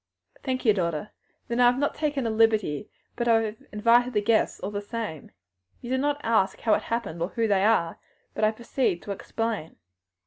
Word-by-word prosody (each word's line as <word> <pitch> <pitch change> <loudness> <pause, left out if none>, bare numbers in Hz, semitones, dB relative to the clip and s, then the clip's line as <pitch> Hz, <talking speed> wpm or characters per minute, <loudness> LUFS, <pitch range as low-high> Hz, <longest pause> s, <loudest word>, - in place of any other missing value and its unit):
"Thank 255 -1 -3
you, 215 - +6
daughter; 170 -1 -2 0.4
then 235 +1 -2
I 245 - +6
have 245 +1 +3
not 285 +1 0
taken 290 -4 -1
a 225 - 0
liberty, 215 -5 +2 0.3
but 240 - -2
I 225 -1 +5
have 215 0 -4
invited 235 +4 +3
the 210 - +2
guests 225 +1 +2
all 195 - -4
the 205 0 -3
same. 205 - -6 0.5
You 240 - -7
do 260 - +2
not 290 +1 0
ask 220 -4 +2
how 220 - +3
it - - +2
happened 210 -8 -3
or 170 - 0
who 230 0 0
they 195 -2 +2
are, 200 -6 +2 0.3
but - - -3
I 215 - +6
proceed 230 -4 -1
to 205 - -6
explain. 215 -3 -3
225 Hz, 205 wpm, -26 LUFS, 205-240 Hz, 0.5 s, you